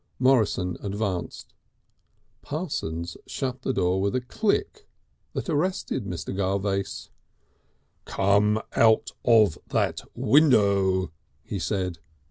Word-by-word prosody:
Morrison 110 -9 +2
advanced. 100 -3 -4 0.9
Parsons 90 - -4
shut 130 -2 -3
the 130 - -1
door 90 -5 +1
with 100 +4 0
a 130 - +1
click 225 - -1 0.5
that - - -4
arrested 160 - -1
Mr. 90 0 -5
Garvace. 100 0 -2 0.9
"Come 100 +2 +2 0.2
out 110 -1 +4
of 110 -8 +4
that - - 0
window," 100 - +3 0.3
he 100 - -4
said. 90 -3 -2
100 Hz, 95 wpm, -26 LUFS, 95-130 Hz, 0.9 s, out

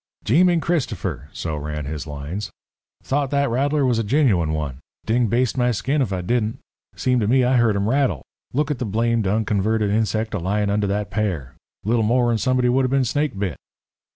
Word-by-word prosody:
"Jeeming 175 - +4
Cristopher!" 95 - -2
so 80 -2 -4
ran 75 0 -4
his 75 +1 -5
lines 75 +8 -5 0.5
"thought 140 0 0
that 140 -2 +1
rattler 140 +3 +1
was 120 -3 +2
a - - 0
gin 140 +7 +3
u 95 -7 +3
ine 80 -1 -1
one. 75 -4 -3 0.3
Ding 120 +1 +2
baste 125 +4 +1
my 125 0 +3
skin 130 +6 0
if 120 -7 0
I 95 -2 -1
didn't. 110 +3 0 0.4
Seemed 125 -2 +1
to 105 - +1
me 130 +3 +4
I 125 +1 +3
heard 115 -3 +3
him 100 +1 0
rattle. 125 - +1 0.3
Look 150 +3 0
at 140 - -3
the 125 - -2
blamed, 115 0 0
unconverted 105 0 +1
insect 110 +1 0
a 105 - -1
layin' 100 +3 0
under 105 0 +1
that 100 +1 -2
pear. 90 - -2 0.3
Little 115 +3 +1
more, 120 +2 +2
and 115 - 0
somebody 130 -1 +2
would 130 +2 +3
a - - +2
been 135 0 +2
snake 145 -2 -1
bit." 95 -8 -2
110 Hz, 210 wpm, -22 LUFS, 100-130 Hz, 0.5 s, Jeeming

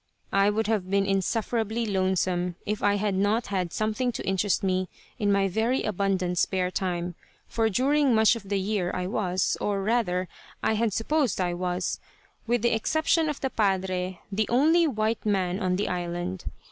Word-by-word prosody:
I 195 +1 +4
would 220 +2 0
have 205 -4 -1
been 195 0 +2
insufferably 220 +3 0
lonesome 185 -3 0
if 210 0 -2
I 205 0 +3
had 205 0 0
not 205 +5 +1
had 180 -3 -1
something 220 +4 -1
to - - -5
interest 195 +1 +1
me 185 -1 0 0.3
in 205 -1 +2
my 195 0 +3
very 225 +7 0
abundant 190 -3 0
spare 185 -1 +1
time, 175 -2 -2 0.3
for 225 -1 +1
during 270 +3 +3
much 220 +1 +5
of 200 -4 -9
the 200 -1 +1
year 190 -2 -1
I 180 - -2
was, 185 -1 0
or 200 -1 0
rather 195 -5 +1 0.4
I - - +2
had 220 0 +1
supposed 260 +2 0
I 180 -1 0
was, 180 0 -2 0.5
with 240 -1 +1
the 235 - +3
exception 315 +7 +1
of 295 - -4
the 265 - -1
Padre, 190 -3 0
the 215 +2 0
only 320 +7 +4
white 220 -4 -1
man 190 -3 0
on 185 -3 0
the 200 - -1
island. 175 +1 -3
200 Hz, 175 wpm, -26 LUFS, 185-225 Hz, 0.5 s, much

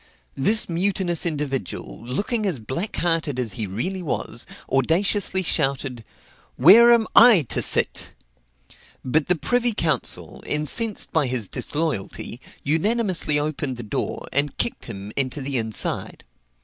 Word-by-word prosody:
This 210 +11 +2
mutinous 175 -1 -1
individual, 140 - -4
looking 200 - -2
as 175 -7 -1
blackhearted 165 - -2
as 120 -5 -2
he 105 +1 -3
really 180 - -3
was, 155 -7 -4 0.2
audaciously 185 - +1
shouted, 135 -6 -1 0.5
"Where 235 +7 +8
am 235 -2 +4
I 225 -9 +8
to - - 0
sit?" - - +1 0.9
But 145 +4 +1
the 180 - +3
privy 245 +7 0
council, 155 - -1
incensed 195 - -1
by 155 -5 +2
his 125 -5 -1
disloyalty, 145 - -3 0.2
unanimously 180 0 0
opened 145 -3 -2
the 120 - -6
door, 105 - -4
and 140 0 0
kicked 235 - -1
him 100 -2 -8
into 135 +1 -1
the 135 -2 -1
inside. 110 -2 0
155 Hz, 125 wpm, -23 LUFS, 130-190 Hz, 0.9 s, Where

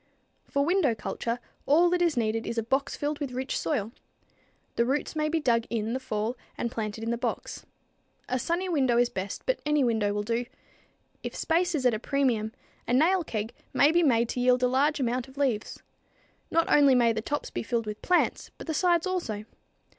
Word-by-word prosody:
For 280 0 +1
window 335 -8 +2
culture, 230 +2 -3 0.3
all 325 +5 +5
that 355 0 +1
is 335 -6 +2
needed 225 -1 0
is 235 - -3
a 230 - +1
box 270 +4 0
filled 295 0 -2
with 275 -4 -4
rich 260 +2 -3
soil. 225 -8 -1 0.8
The 235 - +3
roots 275 +6 -1
may 305 0 0
be 325 +1 +1
dug 235 -6 +2
in 225 0 -1
the 260 - -1
fall 220 -1 -2 0.2
and 235 - -2
planted 220 -2 -4
in 230 - -1
the 235 - -2
box. - - -4 0.6
A 255 - -1
sunny 345 +8 -1
window 265 -9 +2
is 240 0 +4
best, 190 +1 -5
but - - 0
any 300 -1 +2
window 220 -4 +1
will 205 0 -1
do. 235 +2 -1 0.7
If - - -6
space 350 +1 +1
is 265 -4 -1
at 250 - +5
a 215 - -1
premium, 245 -5 0 0.4
a 240 - 0
nail 340 +7 +4
keg 220 -5 -4 0.2
may 290 - +5
be 345 +1 +4
made 235 -7 +3
to - - -3
yield 250 0 +3
a - - +5
large 285 +4 +2
amount 250 -1 -1
of 265 +1 -17
leaves. 255 -7 -1 0.7
Not 330 0 +2
only 280 -3 +6
may 235 -2 +4
the 220 - -2
tops 290 +6 -3
be - - -3
filled 230 +1 -1
with 210 0 -6
plants, 360 -1 +1
but - - -9
the 320 - -2
sides 345 +1 +2
also. 285 - -3
255 Hz, 205 wpm, -28 LUFS, 230-300 Hz, 0.8 s, only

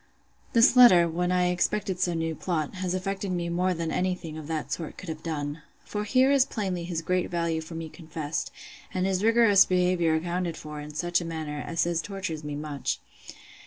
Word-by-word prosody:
This 235 +3 +6
letter, 185 -9 +8
when 175 +2 -1
I 180 -1 +2
expected 185 +1 0
some 175 -2 +1
new 165 0 -1
plot, 155 -2 -2
has 185 -1 -2
affected 195 +1 -3
me 175 -1 -2
more 180 +2 +1
than 165 -1 -3
any 185 0 0
thing 165 -4 -8
of 155 -2 -7
that 160 -2 -3
sort 165 -3 -4
could 185 - -8
have 155 -1 -5
done. 150 -2 -4 0.2
For 210 0 -3
here 260 +5 +4
is 275 -2 +5
plainly 190 -9 -3
his 170 -2 -3
great 180 +1 0
value 170 -2 -1
for 160 +1 -9
me 165 0 -5
confessed, 155 -2 -5 0.5
and 185 0 +1
his 190 0 0
rigorous 225 -3 +6
behaviour 180 -3 +2
accounted 175 +1 -2
for 150 -1 -7
in 150 0 -9
such 175 +2 +1
a - - -5
manner, 155 -3 -4
as 165 -1 +1 0.2
tortures 190 -6 -5
me 150 -1 -4
much. 145 -2 -3
175 Hz, 200 wpm, -27 LUFS, 160-185 Hz, 0.5 s, letter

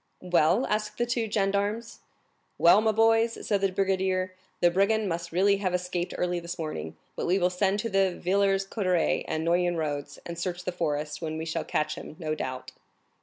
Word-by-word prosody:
"Well?" 180 +6 +3
asked 210 0 -2
the 240 - +1
two 235 -2 -1
gendarmes. 205 +2 -1 0.6
"Well, 175 +5 +6
my 220 0 +3
boys," 225 +1 +3
said 200 -2 +1
the 195 -1 +2
brigadier, 190 -1 0 0.3
"the 175 - +4
brigand 200 +4 +2
must 170 -1 -3
really 200 +4 +3
have 185 -2 -1
escaped 180 -1 -3
early 180 0 0
this 170 +1 -6
morning; 155 - -5 0.2
but - - -3
we 180 +2 +3
will 180 -1 +2
send 190 +2 +1
to 230 - -3
the 195 -1 +3
Villers 195 +1 +2
Coterets 185 -5 0
and 160 +1 -2
Noyon 175 0 +2
roads, 145 -2 -3
and 170 -1 -6
search 180 0 -3
the 180 - -2
forest, 150 -3 -2
when 155 -1 -3
we 160 - -4
shall 160 - -2
catch 155 0 -1
him, - - -10
no 155 -2 -2
doubt." 130 -4 -5
185 Hz, 190 wpm, -27 LUFS, 170-200 Hz, 0.6 s, Well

